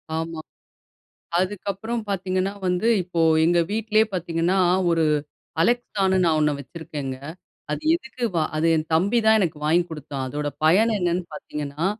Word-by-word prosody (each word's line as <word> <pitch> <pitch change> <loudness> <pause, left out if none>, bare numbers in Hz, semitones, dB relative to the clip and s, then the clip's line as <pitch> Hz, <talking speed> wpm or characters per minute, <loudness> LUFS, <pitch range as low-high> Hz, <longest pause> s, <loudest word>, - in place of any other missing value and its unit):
ஆமா. 165 0 -4 1.0
அதுக்கப்பறம் 205 +4 -3
பாத்தீங்கன்னா 190 0 -1
வந்து, 180 +5 +1 0.2
இப்போ 170 -2 -2 0.2
எங்க 175 +1 +3
வீட்லயே 220 0 +2
பாத்தீங்கன்னா, 175 +1 0 0.3
ஒரு 165 -1 +2 0.6
Alexaன்னு 195 -2 +1
நான் 160 -2 +3
ஒண்ணு 150 -1 +2
வச்சிருக்கேங்க. 140 -2 -6 0.5
அது - - -3
எதுக்கு 265 -7 -8
வா 160 - +2
அது, 155 +2 +1
என் 155 0 -1
தம்பி 195 +9 +3
தான், 220 0 +6
எனக்கு 170 -6 -1
வாங்கி 170 +3 +3
குடுத்தான். 145 -4 -5
அதோட 145 +2 -3 0.2
பயன், 205 +8 +5
என்னன்னு 180 -1 0
பாத்தீங்கன்னா, 150 +2 -5
175 Hz, 135 wpm, -23 LUFS, 160-200 Hz, 1.0 s, தான்